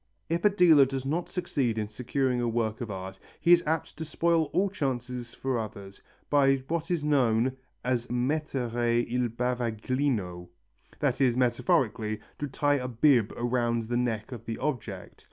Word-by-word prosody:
If 170 +1 0
a 210 - +7
dealer 170 -8 +6
does 135 0 -4
not 160 +5 -1
succeed 140 - -1
in 110 - 0
securing 125 +4 -1
a 120 - 0
work 115 -1 -1
of 120 - -4
art 95 -1 -6 0.2
he 170 - +3
is 175 - +6
apt 160 0 -1
to 160 - -4
spoil 165 +1 +1
all 185 +7 +1
chances 125 - -3
for 130 -3 -1
others 100 -3 -8 0.3
by 135 -2 +4
what 165 0 -2
is 170 -4 0
known 130 -4 +2 0.3
as 125 -1 0
mettere 120 -3 0
il 125 0 0
bavaglino, 120 -5 -1 0.5
that - - 0
is, 125 -2 +3
metaphorically, 120 -3 +1 0.2
to 145 - -2
tie 145 +2 +1
a 125 - -3
bib 125 -2 +3
round 120 -1 0
the 120 - +1
neck 115 -2 -2
of 120 -3 -7
the 115 -1 -4
object. 135 -5 -4
125 Hz, 165 wpm, -28 LUFS, 115-145 Hz, 0.5 s, a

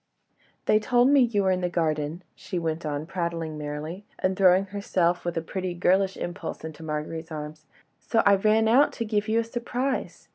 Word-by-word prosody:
"They 215 - +4
told 245 +3 +3
me 285 0 +6
you 225 -5 +3
were 190 - +3
in 185 0 0
the 180 - 0
garden," 160 0 -1
she 185 - -6
went 165 -1 -2
on 145 0 -3
prattling 170 -2 -3
merrily, 150 +5 -5
and 185 0 0
throwing 185 0 +5
herself 185 -3 0
with 165 -2 -3
pretty, 185 0 -3
girlish 190 +2 +2
impulse 175 +3 -5
into 160 0 -8
Marguerite's 160 +1 -4
arms, 155 0 -7 0.3
"so 225 - +1
I 200 - +7
ran 215 +3 +3
out 260 +6 +5
to 230 - -3
give 210 0 0
you 220 +1 +2
a - - +1
surprise. 245 +3 -3
180 Hz, 185 wpm, -26 LUFS, 160-215 Hz, 0.3 s, I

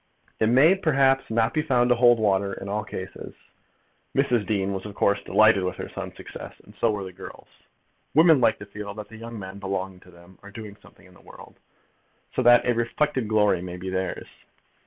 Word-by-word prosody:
It 110 - +2
may 135 +9 +6
perhaps 135 -7 +2
not 115 0 +1
be 155 - +1
found 125 -5 +1
to 125 - +4
hold 120 0 +5
water 100 -2 +1
in 100 - -8
all 105 +2 -2
cases. 95 -3 -8 0.8
Mrs. 125 -7 +1
Dean 100 -2 -1
was 95 -1 -5
of 100 - -10
course 100 0 +1
delighted 110 -1 +4
with 90 - -2
her - - -7
son's - - -8
success, - - -10
and - - -16
so 115 - +1
were 105 -2 -2
the 95 -1 -9
girls. - - -11 0.7
Women 160 -3 +6
like 110 -2 +3
to 105 - -10
feel 100 0 -8
that 105 -1 -8
the 110 - -12
young 115 +1 -8
men 95 0 -8
belonging 95 -1 -4
to 90 - -19
them 85 +1 -18
are 100 - -12
doing 105 0 -9
something - - -20
in 90 - -19
the - - -20
world, - - -15 0.7
so - - 0
that 120 -1 +6
a 120 - +2
reflected 120 +2 -1
glory 105 -4 +2
may 90 0 -7
be 95 +1 -6
theirs. 95 -1 -3
105 Hz, 210 wpm, -24 LUFS, 95-120 Hz, 0.8 s, may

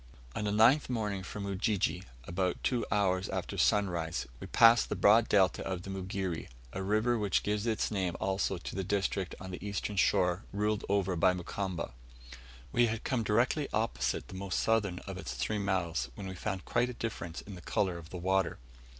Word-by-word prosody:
On 105 - -2
the 105 - 0
ninth 115 +8 +5
morning 105 -5 -1
from 100 +2 -6
Ujiji, 100 -2 0 0.2
about 90 +5 -2
two 125 -3 +1
hours 95 -2 +1
after - - -3
sunrise, 85 -5 +1
we - - -7
passed 115 0 +6
the - - -1
broad 110 +3 +5
delta 95 -3 +4
of 95 -2 -3
the 95 - -6
Mugere, 95 -2 -3 0.3
a 95 - -3
river 110 +4 +2
which 100 -4 +1
gives 105 +2 -1
its 110 -1 0
name 95 -4 -1
also 95 0 0
to 85 - -7
the 95 - -1
district 95 -1 -1
on 95 0 -7
the 90 - -7
eastern 105 0 -3
shore 90 0 +2
ruled 105 +1 0
over 100 -2 +1
by 90 +2 +4
Mukamba. 90 -3 -4 0.8
We 120 0 +4
had 110 0 -3
come 130 -3 0
directly 120 +7 +2
opposite 110 +2 -1
the - - -11
most 95 0 -2
southern 105 -5 +1
of - - -6
its - - -5
three 105 - -1
mouths, 85 -9 -1
when 100 - -7
we 95 - -5
found 95 0 -4
quite 120 +1 +1
a - - -5
difference 90 -8 -5
in 100 - -10
the 90 - -9
colour 90 -1 0
of 80 -1 -12
the 90 - -6
water. 95 0 +1
95 Hz, 195 wpm, -31 LUFS, 90-105 Hz, 0.8 s, passed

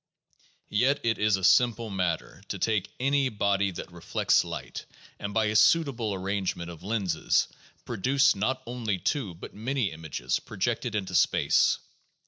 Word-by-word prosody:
Yet 130 +7 +2
it 115 -2 +1
is 105 -1 +3
a 95 - -5
simple 115 +2 +3
matter 90 -4 -2
to - - -4
take 105 -3 0
any 135 +1 +2
body 100 -2 +1
that 90 - -7
reflects - - +1
light, - - -7 0.3
and 100 - -4
by 110 +1 +2
a 105 0 -1
suitable 120 -3 +3
arrangement 95 -2 -2
of 85 - -11
lenses 95 -6 +1 0.4
produce 135 +6 +2
not 130 +6 -1
only 115 -5 -2
two 100 - -2
but 85 - -10
many 120 -1 -1
images, 80 -6 -3
projected 115 +2 -2
into 95 -3 -3
space. 85 - +3
105 Hz, 145 wpm, -27 LUFS, 95-120 Hz, 0.4 s, is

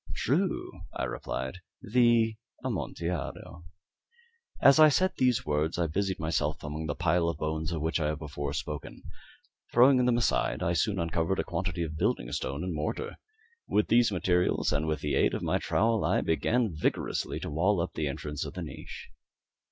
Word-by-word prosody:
"True," - - 0 0.2
I - - -2
replied; 65 +8 -4 0.2
"the 115 -1 +3 0.3
Amontillado." 85 -6 -4 0.9
As 140 - +6
I 155 0 +9
said 185 +6 +2
these 125 -3 +2
words 75 +2 0
I 85 - +1
busied 95 +4 -1
myself 80 -1 -1
among 75 +1 -4
the 75 - -2
pile 85 -1 +2
of 85 - -3
bones 80 +1 -2
of 80 -3 -3
which 80 +2 0
I 75 - 0
have 75 0 -1
before 70 -2 -5
spoken. 75 0 -5 0.7
Throwing 125 +1 +6
them 125 -1 +3
aside, 120 - +1
I 85 - +1
soon 95 +5 +1
uncovered 85 +2 0
a - - 0
quantity 90 -2 -2
of 80 -1 -5
building 95 - 0
stone 70 +6 -3
and 90 -1 -3
mortar. 75 0 -3 0.5
With 105 - +1
these 115 -1 +4
materials 90 -3 +1
and 75 +2 0
with 80 -1 -1
the 75 - -1
aid - - +3
of - - -4
my - - +1
trowel, 115 0 +1
I - - +2
began 110 +6 +1
vigorously 75 - -1
to - - -5
wall 90 +6 +2
up 85 - -2
the 75 - -2
entrance 75 +1 -4
of - - -7
the - - -4
niche. - - -9
85 Hz, 175 wpm, -29 LUFS, 75-105 Hz, 0.9 s, I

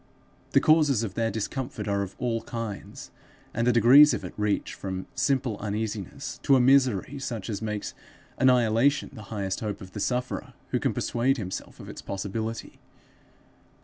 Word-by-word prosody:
The - - +7
causes 150 -7 +4
of 100 -5 -4
their 115 +2 0
discomfort 110 0 -4
are 100 0 +1
of 100 -1 -5
all 115 -2 -1
kinds, 115 -3 -6 0.4
and 115 +1 0
the - - +6
degrees 130 +6 +7
of - - -6
it - - -7
reach 105 -1 -1
from 95 -1 -5
simple 130 -5 0
uneasiness 105 +5 -4
to 140 - +4
a - - +5
misery 130 -1 +3
such 115 -5 -4
as 100 - -4
makes 105 -2 -3 0.5
annihilation 125 +1 +3
the 110 - -9
highest 100 -3 -2
hope 105 -2 -4
of 95 -1 -11
the 105 - -6
sufferer 125 +3 -2
who - - 0
can - - -1
persuade 130 +4 +1
himself 95 -5 -6
of - - -10
its - - -8
possibility. 110 +4 -5
115 Hz, 165 wpm, -27 LUFS, 105-130 Hz, 0.5 s, The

